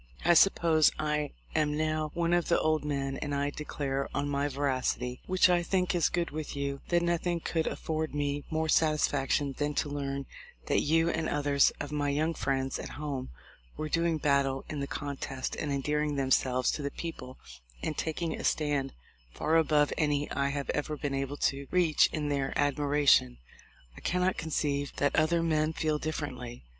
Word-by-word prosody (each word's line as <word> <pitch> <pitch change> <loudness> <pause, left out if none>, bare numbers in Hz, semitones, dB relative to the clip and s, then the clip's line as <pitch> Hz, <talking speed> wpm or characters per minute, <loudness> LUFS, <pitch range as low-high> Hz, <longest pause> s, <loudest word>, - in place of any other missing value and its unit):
I 175 - +6
suppose 165 -3 +5
I 150 -1 -1 0.2
am 150 -1 +1
now 155 0 0
one 170 0 +1
of 175 -1 +2
the 170 - +3
old 155 -1 +1
men; 135 -2 -2
and 145 -1 -3
I 140 +1 0
declare 140 -2 -3
on 145 0 0
my 140 0 0
veracity, 130 -3 -1
which 185 0 +5
I 175 -1 +3
think 180 +1 0
is 170 -4 +2
good 175 -1 -1
with 155 0 -5
you, 140 -1 -3
that 175 0 +3
noth 170 0 0
ing 175 -1 0
could 160 -1 -1
afford 155 -1 -3
me 145 0 -1
more 160 0 0
satisfaction 145 -3 +2
than 145 0 -1
to 150 - 0
learn 140 -1 -3 0.4
that - - +2
you 165 +2 +2
and 160 0 -1
others 145 -1 +3
of 145 0 -5
my 145 -1 0
young 155 +3 +1
friends 135 -3 -1
at - - -6
home 145 -3 -4 0.5
were 155 - -3
doing 165 0 +1
battle 140 -2 +1
in 150 - -4
the 140 - -2
contest 140 -3 -4
and 145 - -3
endearing 150 +2 0
themselves 130 -2 +2
to - - -4
the 140 - -2
people 135 -5 -7 0.5
and 155 - -2
taking 160 +1 -2
a - - -6
stand 145 -3 0 0.4
far 155 - 0
above 150 -2 +3
any 145 -2 +1
I 140 0 0
have 140 0 -2
ever 150 +1 -2
been 145 -1 -3
able 135 +1 -2
to 140 -1 -1
reach 170 -4 +4
in 150 -2 -2
their 140 -2 -1
admiration. 145 - +3 0.6
I - - -11
cannot 180 +1 +1
conceive 145 -3 -1
that 145 - +1
other 165 +2 +3
men 155 -1 +1
feel 155 -1 0
differently. 130 -6 -5
150 Hz, 180 wpm, -30 LUFS, 140-160 Hz, 0.6 s, I